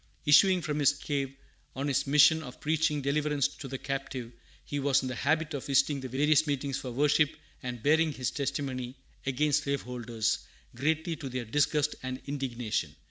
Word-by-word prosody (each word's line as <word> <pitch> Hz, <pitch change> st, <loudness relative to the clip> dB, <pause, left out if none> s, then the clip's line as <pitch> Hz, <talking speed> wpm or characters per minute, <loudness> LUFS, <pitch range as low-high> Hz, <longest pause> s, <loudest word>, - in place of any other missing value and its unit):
Issuing 180 Hz, +5 st, +6 dB
from 150 Hz, -1 st, -2 dB
his 145 Hz, -1 st, +5 dB
cave, 140 Hz, -2 st, -3 dB, 0.4 s
on 135 Hz, +2 st, -2 dB
his 140 Hz, 0 st, 0 dB
mission 150 Hz, +3 st, +6 dB
of 125 Hz, -5 st, -10 dB
preaching 150 Hz, -1 st, +1 dB
"deliverance 145 Hz, 0 st, +1 dB
to 145 Hz, -1 st, -9 dB
the 135 Hz, 0 st, -4 dB
captive," 130 Hz, -3 st, -4 dB, 0.3 s
he 145 Hz, -, -3 dB
was 135 Hz, -1 st, +2 dB
in -, -, -2 dB
the 130 Hz, -, -3 dB
habit 155 Hz, +4 st, 0 dB
of 140 Hz, -, -5 dB
visiting 140 Hz, +1 st, +3 dB
the 130 Hz, -, -5 dB
various 150 Hz, +4 st, +3 dB
meetings 140 Hz, -1 st, -1 dB
for 130 Hz, -, -6 dB
worship 150 Hz, +3 st, +3 dB, 0.3 s
and 125 Hz, -3 st, -6 dB
bearing 160 Hz, +2 st, +4 dB
his 130 Hz, -3 st, -2 dB
testimony 130 Hz, -3 st, -3 dB, 0.3 s
against 145 Hz, +2 st, +1 dB
slaveholders, 120 Hz, -5 st, -1 dB, 0.4 s
greatly 160 Hz, +6 st, 0 dB
to 135 Hz, -, -6 dB
their 125 Hz, -1 st, -4 dB
disgust 150 Hz, +4 st, +1 dB
and 130 Hz, 0 st, -4 dB
indignation. 125 Hz, -6 st, -3 dB
140 Hz, 170 wpm, -29 LUFS, 130-150 Hz, 0.4 s, Issuing